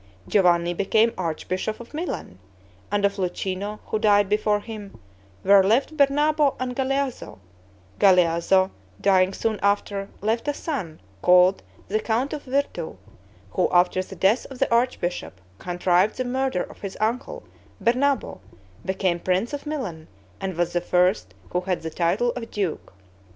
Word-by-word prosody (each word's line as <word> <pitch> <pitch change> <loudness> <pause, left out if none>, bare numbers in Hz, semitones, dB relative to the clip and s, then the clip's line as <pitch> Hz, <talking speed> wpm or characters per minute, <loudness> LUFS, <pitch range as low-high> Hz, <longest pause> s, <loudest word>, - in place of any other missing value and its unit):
Giovanni 175 -3 +3
became 215 +5 +2
archbishop 185 +4 -3
of 235 +3 -12
Milan; 305 - -5 0.5
and 205 0 +2
of 200 - 0
Luchino, 190 +3 -3
who 215 - -2
died 205 -2 +4
before 210 0 +2
him, 210 -3 -9 0.5
were 195 0 +6
left 245 +10 +2
Bernabo 295 0 +3
and 255 -1 -3
Galeazzo; 270 - -2 0.6
Galeazzo, 185 0 +4 0.3
dying 190 -1 +3
soon 220 +1 -2
after, 200 0 0
left 225 +5 -1
a 290 - 0
son 220 - -4 0.2
called 180 +1 +5 0.3
the 215 +2 0
Count 235 +6 -1
of 300 - -4
Virtu, 280 +2 -2 0.5
who - - +1
after 180 +1 +3
the 190 +1 -9
death 195 +7 +2
of 265 - -9
the 235 - +1
archbishop, 205 - -1 0.2
contrived 180 +3 +1
the 255 - -1
murder 260 -5 0
of - - -13
his 195 -2 -6
uncle, 230 +5 -2 0.4
Bernabo, 260 - +1 0.4
became 185 -2 0
prince 185 +9 0
of 290 +1 -5
Milan, 205 - -4 0.3
and 190 -3 -4
was 175 0 0
the 175 - +1
first 175 - +1 0.2
who 180 - 0
had 180 -2 -2
the 160 - -4
title 180 +9 +1
of 235 -2 -7
duke. 195 -6 -3
200 Hz, 145 wpm, -24 LUFS, 180-245 Hz, 0.6 s, were